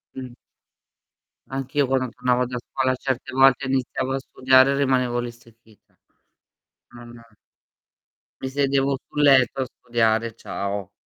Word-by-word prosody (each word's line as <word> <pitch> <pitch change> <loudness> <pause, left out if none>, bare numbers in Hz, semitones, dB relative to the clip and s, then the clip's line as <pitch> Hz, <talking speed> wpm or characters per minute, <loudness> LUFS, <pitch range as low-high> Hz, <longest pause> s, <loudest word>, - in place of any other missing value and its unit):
Mh. 130 -2 -8 1.2
Anch'io 135 +1 -1
quando 130 -1 0
tornavo 125 +1 0
da 125 0 -5
scuola 130 +1 -2
certe 130 -1 -4
volte 135 0 +4
iniziavo 130 0 -2
a 135 - -1
studiare 130 0 +3
e - - 0
rimanevo 125 -3 +1
lì 120 0 -4
stecchita. 115 -2 -21 1.0
Non 120 0 -13 1.2
Mi 130 - -3
sedevo 140 0 0
sul 150 - -3
letto 135 -2 +4
a 130 - -1
studiare 115 -2 0
e 115 - -11
ciao. 100 -3 -5
130 Hz, 130 wpm, -23 LUFS, 120-135 Hz, 1.2 s, volte